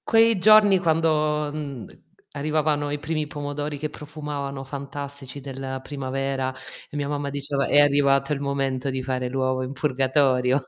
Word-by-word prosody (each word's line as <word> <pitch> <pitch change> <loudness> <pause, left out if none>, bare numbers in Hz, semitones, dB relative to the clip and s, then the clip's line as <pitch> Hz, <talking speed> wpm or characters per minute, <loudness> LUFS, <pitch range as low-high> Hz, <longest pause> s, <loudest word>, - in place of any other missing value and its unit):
Quei 225 -2 +5
giorni, 205 -1 +7
quando, 155 -3 +1
mhmm, 140 -6 -5 0.5
arrivavano 150 0 0
i 145 - -1
primi 155 0 -2
pomodori 145 0 -4
che 155 +2 -3
profumavano 145 -3 -6
fantastici 140 0 -7
della 135 -1 -5
primavera, 135 -1 -3 0.4
e 145 - -6
mia 145 -1 -1
mamma 145 -1 -2
diceva: 140 0 -1
"È 145 - +5
arrivato 140 -1 +4
il 140 - -3
momento 135 -1 -1
di 130 -1 -3
fare 125 -1 -2
l'uovo 130 0 0
in 130 +1 -5
purgatorio." 135 -1 +2
140 Hz, 145 wpm, -24 LUFS, 135-150 Hz, 0.5 s, giorni